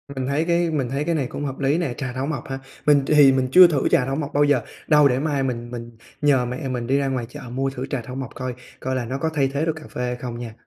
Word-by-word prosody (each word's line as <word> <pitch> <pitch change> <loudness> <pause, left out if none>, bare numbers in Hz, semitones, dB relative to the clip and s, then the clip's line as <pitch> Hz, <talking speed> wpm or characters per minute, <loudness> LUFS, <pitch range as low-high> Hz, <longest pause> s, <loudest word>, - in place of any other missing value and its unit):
Mình 130 -1 -2
thấy 145 +4 0
cái 170 0 +2
mình 135 -6 -1
thấy 140 +3 -1
cái 170 0 0
này 140 -5 -1
cũng 145 - -5
hợp 135 -1 -5
lý 140 +2 +2
nè, 170 -8 -1
trà 130 -3 -4
thảo 130 +2 -2
mộc 150 -1 -4
hả? 135 - -4 0.3
Mình 145 -2 +5
thì 145 -3 +7
mình 130 -1 +1
chưa 180 +4 +9
thử 150 -5 0
trà 125 - +3
thảo 135 +1 -2
mộc 145 -1 -4
bao 145 - +4
giờ, 145 -4 +3 0.3
đâu 150 -2 +6
để 125 -1 +1
mai 145 -2 0
mình 120 -2 -3
mình 120 -1 -8 0.2
nhờ 140 -4 +3
mẹ 125 +3 -4
mình 120 -2 -3
đi 135 - +2
ra 140 -1 0
ngoài 130 -3 -2
chợ 145 +3 -9
mua 135 +1 0
thử 130 -1 -5
trà 140 -4 -2
thảo 125 +3 -8
mộc 135 -3 -5
coi, 130 0 -4 0.3
coi 130 0 -2
là 125 -2 -2
nó 130 +4 -3
có 160 +3 -1
thay 140 -3 +2
thế 140 +3 -2
được 160 - 0
cà 155 - -10
phê - - -5
hay 125 0 -2
không 120 -1 -6
nha. 115 -2 -7
135 Hz, 310 wpm, -22 LUFS, 125-145 Hz, 0.3 s, chưa